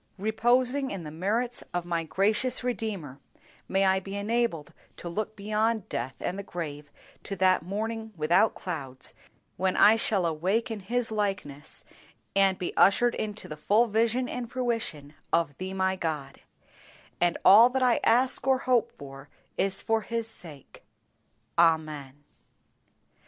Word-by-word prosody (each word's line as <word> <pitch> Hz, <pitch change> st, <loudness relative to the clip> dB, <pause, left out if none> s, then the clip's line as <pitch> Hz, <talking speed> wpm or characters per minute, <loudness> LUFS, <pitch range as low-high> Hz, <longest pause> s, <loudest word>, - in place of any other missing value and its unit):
Reposing 245 Hz, +6 st, +1 dB
in 195 Hz, -4 st, -5 dB
the 150 Hz, -, -7 dB
merits 220 Hz, +9 st, -1 dB
of 175 Hz, -1 st, -1 dB
my 170 Hz, -1 st, -1 dB
gracious 215 Hz, +10 st, +1 dB
Redeemer, 200 Hz, -, -4 dB, 0.5 s
may 195 Hz, +1 st, +2 dB
I 190 Hz, 0 st, +3 dB
be 195 Hz, +1 st, -7 dB
enabled 205 Hz, -6 st, -1 dB, 0.2 s
to -, -, -7 dB
look 215 Hz, +5 st, -3 dB
beyond 215 Hz, +1 st, -1 dB
death 125 Hz, +2 st, -3 dB
and 185 Hz, +3 st, -3 dB
the -, -, -2 dB
grave, 150 Hz, -6 st, -6 dB, 0.3 s
to 195 Hz, -, -5 dB
that 185 Hz, 0 st, +3 dB
morning 220 Hz, +5 st, -4 dB
without 165 Hz, +8 st, +3 dB
clouds, 140 Hz, -7 st, -5 dB, 0.4 s
when 185 Hz, +1 st, 0 dB
I 220 Hz, +2 st, +7 dB
shall 200 Hz, -5 st, 0 dB
awake 185 Hz, +9 st, 0 dB
in 220 Hz, -, -4 dB
His 230 Hz, +4 st, -2 dB
likeness, 195 Hz, -9 st, -3 dB, 0.5 s
and 195 Hz, -1 st, +4 dB
be 180 Hz, -, -4 dB
ushered 235 Hz, +6 st, +4 dB
into 210 Hz, 0 st, -5 dB
the 150 Hz, -, -6 dB
full 210 Hz, +10 st, +3 dB
vision 230 Hz, +3 st, +1 dB
and 245 Hz, -2 st, -5 dB
fruition 225 Hz, -, -3 dB, 0.2 s
of 165 Hz, -4 st, +1 dB
Thee 185 Hz, 0 st, -4 dB
my 190 Hz, 0 st, +1 dB
God; 150 Hz, -6 st, -4 dB, 0.8 s
and 175 Hz, -1 st, +2 dB
all 215 Hz, +6 st, +9 dB
that 260 Hz, +1 st, 0 dB
I 245 Hz, -2 st, +4 dB
ask 255 Hz, +3 st, +3 dB
or 265 Hz, -1 st, +5 dB
hope 250 Hz, -3 st, +1 dB
for 135 Hz, 0 st, -11 dB, 0.3 s
is 195 Hz, -1 st, -1 dB
for 225 Hz, 0 st, +1 dB
His 230 Hz, +2 st, -3 dB
sake. 160 Hz, -, -11 dB, 0.8 s
Amen. 155 Hz, -4 st, +1 dB
195 Hz, 145 wpm, -28 LUFS, 165-225 Hz, 0.8 s, all